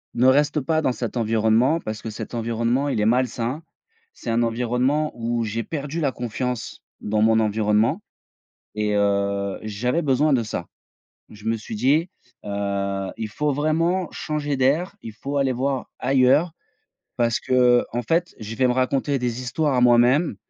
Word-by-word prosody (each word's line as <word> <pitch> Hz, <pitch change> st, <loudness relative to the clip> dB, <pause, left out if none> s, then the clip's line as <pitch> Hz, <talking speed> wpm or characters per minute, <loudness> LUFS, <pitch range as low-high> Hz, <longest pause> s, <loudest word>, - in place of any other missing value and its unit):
ne 120 Hz, +2 st, +2 dB
reste 145 Hz, +3 st, +3 dB
pas 160 Hz, +3 st, 0 dB
dans 130 Hz, -, +1 dB
cet 120 Hz, -1 st, -4 dB
environnement 115 Hz, +6 st, +2 dB
parce 110 Hz, -7 st, -6 dB
que 110 Hz, -, -5 dB
cet 110 Hz, -, -7 dB
environnement, 115 Hz, +4 st, 0 dB
il 120 Hz, -, -1 dB
est -, -, +2 dB
malsain». 125 Hz, +4 st, 0 dB, 0.5 s
C'est -, -, -8 dB
un 120 Hz, +1 st, +2 dB
environnement 125 Hz, +6 st, 0 dB
où 115 Hz, 0 st, -1 dB
j'ai 115 Hz, +2 st, -2 dB
perdu 150 Hz, +3 st, -4 dB
la 140 Hz, -3 st, +1 dB
confiance 125 Hz, 0 st, -4 dB, 0.2 s
dans 105 Hz, 0 st, 0 dB
mon 110 Hz, 0 st, +4 dB
environnement 110 Hz, -, +1 dB, 0.7 s
et 105 Hz, -1 st, 0 dB
heu, 100 Hz, -1 st, 0 dB
j'avais 120 Hz, +9 st, -1 dB
besoin 145 Hz, 0 st, +2 dB
de 120 Hz, -3 st, +2 dB
ça. 85 Hz, -5 st, -5 dB, 0.6 s
Je 105 Hz, -1 st, -14 dB
me 115 Hz, 0 st, +1 dB
suis 110 Hz, 0 st, -7 dB
dit, 145 Hz, -, +2 dB, 0.3 s
heu: 100 Hz, -1 st, -2 dB
«Il 110 Hz, -, -4 dB
faut 150 Hz, +7 st, -1 dB
vraiment 165 Hz, +5 st, 0 dB
changer 145 Hz, -2 st, -3 dB
d'air, 155 Hz, +10 st, +1 dB
il 110 Hz, -, -7 dB
faut 140 Hz, +6 st, -5 dB
aller 135 Hz, -2 st, +2 dB
voir 130 Hz, +1 st, -2 dB
ailleurs». 135 Hz, +5 st, +3 dB, 0.7 s
Parce 115 Hz, -1 st, +1 dB
qu'en 125 Hz, -1 st, +2 dB
fait, 170 Hz, +2 st, +1 dB
je 110 Hz, +1 st, -6 dB
vais 130 Hz, +2 st, +3 dB
me 125 Hz, -, +2 dB
raconter 135 Hz, +2 st, 0 dB
des 125 Hz, 0 st, -2 dB
histoires 135 Hz, +3 st, 0 dB
à 125 Hz, -, +2 dB
moi-même. 125 Hz, -, +4 dB
125 Hz, 165 wpm, -23 LUFS, 110-140 Hz, 0.7 s, mon